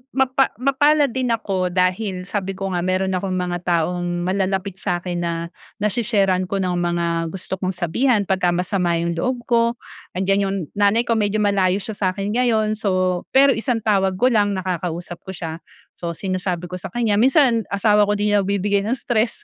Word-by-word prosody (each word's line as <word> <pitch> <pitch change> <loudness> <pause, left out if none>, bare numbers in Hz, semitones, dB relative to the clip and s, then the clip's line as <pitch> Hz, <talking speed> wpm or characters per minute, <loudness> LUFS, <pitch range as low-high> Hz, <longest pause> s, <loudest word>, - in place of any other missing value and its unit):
mapa 265 0 +3
mapalad 275 +3 +3
din 255 +1 -1
ako 200 -6 0
dahil 185 +1 0
sabi 195 0 -3
ko 195 0 -4
nga 180 - -1
meron 185 +2 0
akong 185 0 -2
mga 180 -1 -2
taong 175 +1 0
malalapit 190 +1 -1
sa 180 -3 -2
'kin 175 -1 -3
na 170 0 -3 0.2
nase-share-an 205 -4 +1
ko 200 - -3
ng 185 -2 0
mga 170 -1 0
gusto 190 +2 -5
kong 185 -1 -2
sabihan 205 +6 +1
pagka 180 -2 +1
masama 180 -1 0
'yung 170 +1 -1
loob 250 +3 -1
ko. 235 0 +2 0.4
Nandiyan 195 +2 +1
'yung 195 - -2 0.2
nanay 205 +3 +2
ko 230 -2 0
medyo 205 0 0
malayo 195 -1 +2
siya 220 -1 -6
sa 185 -2 0
'kin 200 +1 -3
ngayon, 220 -3 +1
so, 185 -3 0
pero 275 +1 +7
isang 230 -2 -1
tawag 195 -3 +2
ko 250 +7 +2
lang 205 -2 +2
nakakausap 175 -2 -4
ko 190 - -5
siya. 165 -1 -5 0.4
So, 170 -1 -4
sinasabi 185 -1 -3
ko 180 - -5
sa 195 - -6
kanya. 215 0 0
Minsan 255 -2 +4
asawa 210 0 +3
ko 205 - +1
din 205 0 0
nagbibigay 200 0 +1
ng 245 - +1
stress, 235 -2 -1
195 Hz, 180 wpm, -21 LUFS, 180-220 Hz, 0.4 s, pero